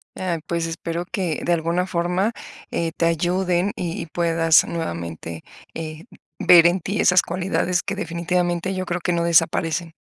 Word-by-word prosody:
Ah, 180 -3 -2
pues 170 -1 -1
espero 165 +1 -4
que 175 -5 -2
de 175 - +2
alguna 170 +2 0
forma 180 +4 0 0.4
eh, 165 -1 -1
te 165 - +1
ayuden 175 +3 +1
y 175 - -3
y - - -5
puedas 165 -1 +3
nuevamente 85 - -5 0.3
eh, 160 0 -6 0.3
ver 170 -2 +7
en 180 +2 +1
ti 195 +4 -3
esas 180 0 +5
cualidades 180 0 -1
que 200 - -3
definitivamente 175 0 -1
yo 185 0 -3
creo 175 0 -3
que 175 - 0
no 170 0 0
desaparecen. 165 0 +1
170 Hz, 160 wpm, -22 LUFS, 165-180 Hz, 0.4 s, ver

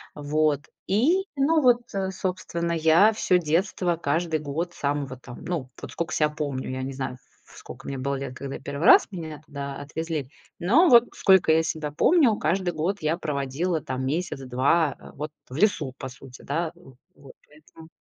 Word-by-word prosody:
Вот, 150 0 +1 0.3
и, 295 - +3
ну, 310 +4 +3
вот, 245 -3 +5
э, 190 -1 -1
собственно, 180 -3 -3
я 165 +7 +5
всё 185 -3 +2
детство, 175 +2 0
каждый 160 +1 0
год 155 +4 -4
с - - -17
самого 140 -2 -2
там, 125 -1 -11
ну, 145 -8 -3
вот - - -7
сколько 170 - -3
ся 150 - +3
помню. 145 -4 -4
Я 130 0 -4
не 135 - -4
знаю, 130 -1 -4 0.3
в - - -17
сколько - - -11
мне 135 - -4
было 140 +2 -2
лет, 135 -1 -5
когда 140 0 -6
я - - -9
1 140 +4 -4
раз - - +8
меня 160 -5 -7
туда 140 -1 -6
отвезли. 155 -1 -4 0.3
Но 260 - +5
вот 240 -2 +8
сколько 190 -4 +5
я 160 +1 +3
себя 155 -2 -3
помню, 255 - +4
каждый 175 +2 0
год 170 +6 -1
я 155 +1 +1
проводила 150 +2 -2
там 130 -1 -4
месяц-два, 140 -1 0
а, - - -13
вот, 150 +2 -6 0.2
э, - - -10
в - - -5
лесу, 160 -9 +1
по 130 - -6
сути, 130 0 -13
да, 160 +3 -2
в 135 -8 -17 0.2
вот, 135 -2 -15
поэтому 155 +2 -17
155 Hz, 190 wpm, -25 LUFS, 140-180 Hz, 0.3 s, раз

